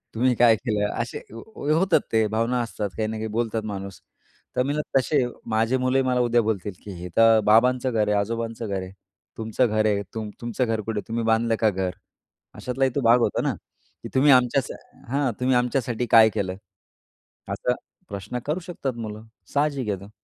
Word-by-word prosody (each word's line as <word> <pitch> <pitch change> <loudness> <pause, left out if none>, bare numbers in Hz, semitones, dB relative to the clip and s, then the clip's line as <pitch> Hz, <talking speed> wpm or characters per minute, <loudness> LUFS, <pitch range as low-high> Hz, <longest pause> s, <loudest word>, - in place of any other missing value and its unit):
तुम्ही 125 +2 +3
काय 115 -1 +6
केलं? 105 -4 -1
असे 120 - -5 0.2
होतात 160 - +1
ते 110 -1 +3
भावना 115 +3 0
असतात 110 -3 -3
काही 110 - 0
ना 110 - -4
काही 110 - -3
बोलतात 110 0 -2
माणूस. 100 -2 -6 0.5
तर 125 - +2
मी 140 +2 -1
म्हटलं 150 -3 0
तसे 135 0 +1 0.3
माझे 115 +4 +2
मुलंही 130 +1 +2
मला 125 -1 +1
उद्या 120 -1 +3
बोलतील, 105 -2 -2
की 100 - -8
हे 90 - -6
तर 115 -1 +6
बाबांचं 125 +4 +4
घर 110 -2 +1
आहे, 105 0 +2
आजोबांचं 115 +2 -3
घर 95 -1 -2
आहे. 95 0 -8 0.5
तुमचं 110 +3 +1
घर 110 0 +1
आहे, 100 -1 +2
तुम 110 -2 -4
तुमचं 120 +2 -1
घर 110 -2 -1
कुठे 110 0 -3
आहे? - - -10
तुम्ही 115 0 -2
बांधलं 115 0 +2
का 110 - +4
घर? 95 -2 -2 0.6
अशातलाही 130 +1 -1
तो 140 - +1
भाग 120 0 +5
होता 120 - +1
ना. - - 0 0.5
की - - -6
तुम्ही 140 +2 +6
आमच्यासा 125 0 +3 0.4
हां, 140 -3 +1
तुम्ही 125 0 +2
आमच्यासाठी 125 -1 0
काय 110 -1 +8
केलं? 95 -2 -3 0.9
असा - - 0 0.4
प्रश्न 100 +5 -5
करू 150 +5 -1
शकतात 165 -7 -4
मुलं. 110 -1 -6 0.3
साहजिक 140 -4 0
येतं. 100 -1 -4
115 Hz, 185 wpm, -24 LUFS, 110-125 Hz, 0.9 s, काय